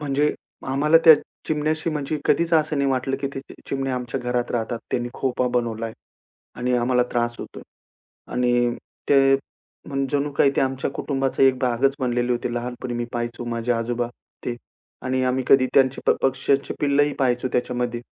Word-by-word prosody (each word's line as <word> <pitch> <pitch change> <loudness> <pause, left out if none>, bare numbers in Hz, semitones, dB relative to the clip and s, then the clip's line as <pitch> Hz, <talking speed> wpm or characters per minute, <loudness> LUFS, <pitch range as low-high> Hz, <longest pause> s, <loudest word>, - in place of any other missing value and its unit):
म्हणजे 145 0 +1 0.4
आम्हाला 150 +4 +4
त्या 160 -1 +11 0.3
चिमण्याशी 155 +1 0
म्हणजे 150 0 -2
कधीच 170 0 +2
असं 155 -2 +2
नाही 140 -1 +2
वाटलं, 135 +1 0
की 140 - -1
ते 135 - -4 0.3
चिमण्या 135 -1 -1
आमच्या 125 -1 -3
घरात 125 0 -1
राहतात, 115 0 -2
त्यांनी 120 0 -1
खोपा 125 -1 0
बनवलाय 115 -1 -3 0.6
आणि 125 +1 -1
आम्हाला 125 +1 +2
त्रास 120 0 0
होतोय - - -9 0.7
आणि 120 -1 +2 0.3
ते, 135 -1 +5 0.5
मग 135 -1 -1
जणू 145 0 0
काही 140 0 +4
ते - - +3
आमच्या 135 0 -1
कुटुंबाचा 135 -1 -1
एक 130 -1 +5
भागच 130 +2 +1
बनलेले 120 -1 0
होते. 120 0 -2
लहानपणी 120 +1 -4
मी 120 0 -2
पाहायचो 120 0 -3
माझे 120 0 -1
आजोबा 120 +1 -1 0.4
ते 120 -1 -2 0.5
आणि 130 0 0
आम्ही 130 0 0
कधी 130 -1 +6
त्यांचे 135 -1 +4
प-पक्ष्याचे 135 +1 +1
पिल्लंही 145 0 +3
पाहायचो 125 -1 +1
त्याच्यामध्ये. 120 -1 -1
130 Hz, 160 wpm, -23 LUFS, 120-140 Hz, 0.7 s, त्या